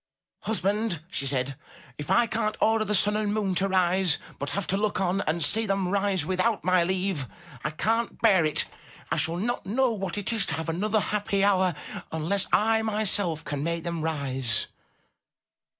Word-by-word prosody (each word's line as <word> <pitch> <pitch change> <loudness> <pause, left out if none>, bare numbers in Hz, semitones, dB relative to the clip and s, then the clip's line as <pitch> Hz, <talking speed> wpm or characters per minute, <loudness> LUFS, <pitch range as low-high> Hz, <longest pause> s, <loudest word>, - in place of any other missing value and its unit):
"Husband!" 205 -4 -1
she 140 - 0
said, 135 0 -1 0.4
"if 150 - -6
I 240 - +4
can't 220 -2 -2
order 220 0 +3
the 210 0 0
sun 210 +2 +4
and 210 -1 0
moon 205 -3 0
to 195 +2 +1
rise, 185 -2 +2 0.2
but 140 - -3
have 200 -2 -2
to 195 - -1
look 205 +1 0
on 190 +1 0
and 160 +1 0
see 220 +8 +2
them 195 -2 0
rise 195 -4 +1
without 190 +5 0
my 185 -1 +3
leave, 185 -6 -1 0.4
I - - 0
can't 225 +9 -1
bear 195 -7 +4
it. 155 -1 +2 0.5
I - - +1
shall 165 +1 0
not 235 +4 -2
know 250 +4 +2
what 195 -3 -4
it 205 +3 -1
is 220 -3 0
to - - -2
have 160 0 -4
another 205 +6 0
happy 205 -1 -1
hour 190 -4 +3 0.4
unless 170 +5 0
I 220 +1 +3
myself 205 -7 +1
can 145 -1 -3
make 170 0 -2
them 170 -2 -3
rise." 135 -7 0
190 Hz, 180 wpm, -26 LUFS, 165-210 Hz, 0.5 s, I